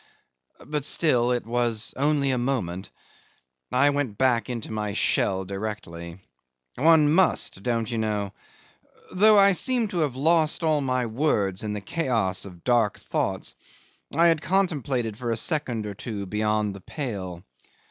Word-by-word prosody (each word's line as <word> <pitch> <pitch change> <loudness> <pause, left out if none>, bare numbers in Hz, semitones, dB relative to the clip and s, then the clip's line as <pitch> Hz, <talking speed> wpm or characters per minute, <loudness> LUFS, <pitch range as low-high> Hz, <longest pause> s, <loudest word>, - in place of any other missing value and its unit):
But 150 -1 -3
still 125 -5 +2
it 120 -2 -1
was 115 -1 -1
only 140 0 +1
a 130 - 0
moment: 100 -8 -2 0.8
I 140 +3 +4
went 140 -8 -2
back 125 -3 +2
into 115 -3 -5
my 105 -2 -3
shell 95 -2 +1
directly. 95 -4 -6 0.6
One 155 +1 +5
must 175 - +2
don't 115 0 -1
you 115 - -2
know? 105 -3 -2 0.8
though 210 +3 +6
I 200 0 +7
seemed 235 +3 +1
to 175 - -2
have 145 -6 0
lost 160 +3 +2
all 155 -2 +2
my 130 -2 0
words 110 -6 0
in 105 -1 -3
the 105 - -4
chaos 110 - -1
of 90 -4 -12
dark 120 -5 +2
thoughts - - -3 0.6
I 170 - +4
had 165 -3 +3
contemplated 140 - -1
for 120 -1 -4
a 115 - 0
second 120 -4 -1
or 105 - -5
two 100 0 -6
beyond 105 +1 0
the 100 - -10
pale. 95 - -5
120 Hz, 150 wpm, -25 LUFS, 105-150 Hz, 0.8 s, I